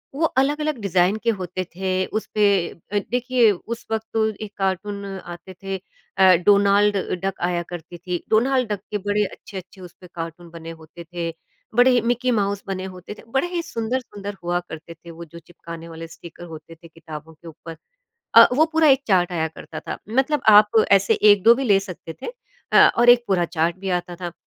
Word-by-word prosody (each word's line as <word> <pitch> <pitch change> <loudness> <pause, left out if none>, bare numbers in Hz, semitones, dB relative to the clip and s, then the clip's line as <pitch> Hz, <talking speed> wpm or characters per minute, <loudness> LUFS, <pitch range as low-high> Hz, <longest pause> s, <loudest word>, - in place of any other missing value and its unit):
वो 320 - +1
अलग-अलग 295 +1 0
डिज़ाइन 185 +1 +2
के 235 - +1
होते 185 +1 -4
थे 185 0 -1
उसपे 215 0 -1 0.2
अ, 205 +4 -4
देखिए, 245 -2 +3
उस 225 +5 -7
वक़्त 220 0 -2
तो 220 -1 +2
एक 210 -1 -8
कार्टून 200 +1 -2
आते 185 -1 -9
थे 195 0 -3 0.4
अ, 190 -1 +7
डोनाल्ड 205 0 +4 0.3
डक 195 -1 -3
आया 175 -1 -1
करती 175 0 -8
थी 180 0 -5
डोनाल्ड 250 +2 +2
डक 205 - -2
के 210 - 0
बड़े 205 +1 0
अच्छे-अच्छे 190 -1 -10
उस 175 -2 -11
पर 180 - -12
कार्टून 165 +1 -7
बने 165 0 -10
होते 160 +1 -12
थे, 170 -1 -3 0.4
बड़े 245 +2 +6
ही 245 -1 +3
मिक्की 245 +2 0
माउस 200 -2 -1
बने 190 -1 -4
होते 185 +2 -10
थे - - -15
बड़े 270 +6 +1
ही 350 -1 -3
सुंदर-सुंदर 225 -6 -4
हुआ 175 +1 0
करते 165 -1 -10
थे 170 +1 -14
वो 170 +1 -10
जो 170 +1 -13
चिपकाने 170 0 -11
वाले 165 0 -9
स्टीकर 170 +1 -13
होते 165 0 -11
थे 165 +1 -16
किताबों 160 -1 -11
के 165 +2 -16
ऊपर। 165 +1 -10 0.6
अ, - - +10
वो 295 +5 +4
पूरा 320 -1 +4
एक 270 0 +4
चार्ट 180 -3 +2
आया 160 -2 -1
करता 160 - -10
था - - -6
मतलब 265 +5 0
आप 210 +1 +6
ऐसे 195 0 +4
1-2 210 +2 +6
भी 270 +3 -3
ले 205 -5 +4
सकते 185 -4 -9
थे, - - -5 0.5
अ, - - +8
और 240 +1 +4
एक 240 0 +5
पूरा 185 -3 +2
चार्ट 170 0 -1
भी 195 0 -4
आता 175 0 -9
था। 175 -1 -6
195 Hz, 195 wpm, -22 LUFS, 170-220 Hz, 0.6 s, अ